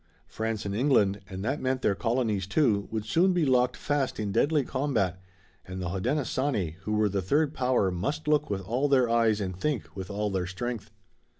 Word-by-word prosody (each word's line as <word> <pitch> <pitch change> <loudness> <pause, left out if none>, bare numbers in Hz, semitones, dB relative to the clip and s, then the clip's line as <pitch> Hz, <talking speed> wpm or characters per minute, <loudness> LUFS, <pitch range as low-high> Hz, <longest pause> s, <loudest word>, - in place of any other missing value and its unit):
France 110 -1 -3
and 100 - -2
England, 105 -5 +2
and 95 +1 -5
that 135 +5 -1
meant 130 0 -1
their 100 - +3
colonies, 115 -4 0
too, 105 -3 +2
would 110 -1 -3
soon 180 - +3
be 175 -3 +2
locked 125 -1 +2
fast 145 -4 -1
in 105 -2 -2
deadly 145 +7 +2
combat, 115 - -1 0.4
and 95 0 -7
the 90 -2 -3
Hodenosaunee, 115 - -1
who 105 - -1
were 105 0 +3
the 100 -1 -1
third 145 - +1
power, 125 -8 +1
must 140 - -3
look 150 -2 +2
with 100 -2 -2
all 120 +9 0
their 130 -3 +4
eyes 115 -2 +2
and 95 -3 -3
think 135 +3 -3
with 95 0 -6
all 105 0 -2
their 95 -2 -1
strength. 110 +3 -4
110 Hz, 195 wpm, -28 LUFS, 100-135 Hz, 0.4 s, their